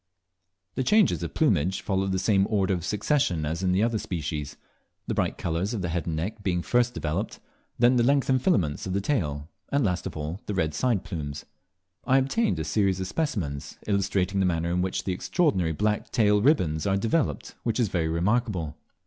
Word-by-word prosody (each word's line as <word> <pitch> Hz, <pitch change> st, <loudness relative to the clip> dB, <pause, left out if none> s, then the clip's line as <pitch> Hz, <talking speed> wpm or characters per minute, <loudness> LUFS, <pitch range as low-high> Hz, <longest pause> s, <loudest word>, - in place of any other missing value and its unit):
The 130 Hz, -, -1 dB
changes 190 Hz, -, +3 dB
of 85 Hz, -2 st, -5 dB
plumage 95 Hz, -, +2 dB
follow 95 Hz, -1 st, 0 dB
the 95 Hz, -1 st, 0 dB
same 95 Hz, 0 st, +2 dB
order 100 Hz, -3 st, +1 dB
of 90 Hz, -3 st, -2 dB
succession 100 Hz, -, 0 dB
as 80 Hz, +4 st, -2 dB
in 95 Hz, -1 st, +1 dB
the 95 Hz, +3 st, +2 dB
other 115 Hz, -1 st, +1 dB
species, 75 Hz, -5 st, -4 dB, 0.5 s
the -, -, -2 dB
bright -, -, 0 dB
colours 85 Hz, +7 st, -2 dB
of 100 Hz, -, -3 dB
the 90 Hz, -, -1 dB
head 85 Hz, +1 st, -2 dB
and 80 Hz, -, -1 dB
neck 100 Hz, +7 st, -3 dB
being 90 Hz, -3 st, -1 dB
first 125 Hz, 0 st, +1 dB
developed, 75 Hz, -1 st, -3 dB, 0.4 s
then 125 Hz, +1 st, +4 dB
the 120 Hz, -, +4 dB
lengthened 135 Hz, 0 st, +3 dB
filaments 90 Hz, -, +1 dB
of 90 Hz, -, -2 dB
the 100 Hz, -, +1 dB
tail, 75 Hz, -, -1 dB, 0.2 s
and 140 Hz, -3 st, +2 dB
last 90 Hz, -1 st, -1 dB
of 85 Hz, -, -7 dB
all, 80 Hz, +5 st, -4 dB
the 105 Hz, -, -2 dB
red 80 Hz, -4 st, 0 dB
side 115 Hz, +2 st, +1 dB
plumes. 75 Hz, -7 st, -5 dB, 0.6 s
I 130 Hz, -, +3 dB
obtained 135 Hz, -, +1 dB
a -, -, -2 dB
series 100 Hz, -3 st, +1 dB
of 95 Hz, -, -2 dB
specimens, 95 Hz, -, -3 dB
illustrating 100 Hz, -1 st, 0 dB
the 95 Hz, -, +3 dB
manner 85 Hz, -1 st, 0 dB
in 90 Hz, +1 st, +1 dB
which 95 Hz, 0 st, -1 dB
the 95 Hz, -, -1 dB
extraordinary 95 Hz, -, +1 dB
black 105 Hz, +6 st, -1 dB
tail 105 Hz, -2 st, +3 dB
ribands 90 Hz, -, +2 dB
are 95 Hz, 0 st, +2 dB
developed, 115 Hz, +10 st, -1 dB
which 115 Hz, +1 st, -1 dB
is 115 Hz, -5 st, +2 dB
very 85 Hz, -2 st, 0 dB
remarkable. 90 Hz, -, 0 dB
95 Hz, 200 wpm, -26 LUFS, 85-115 Hz, 0.6 s, then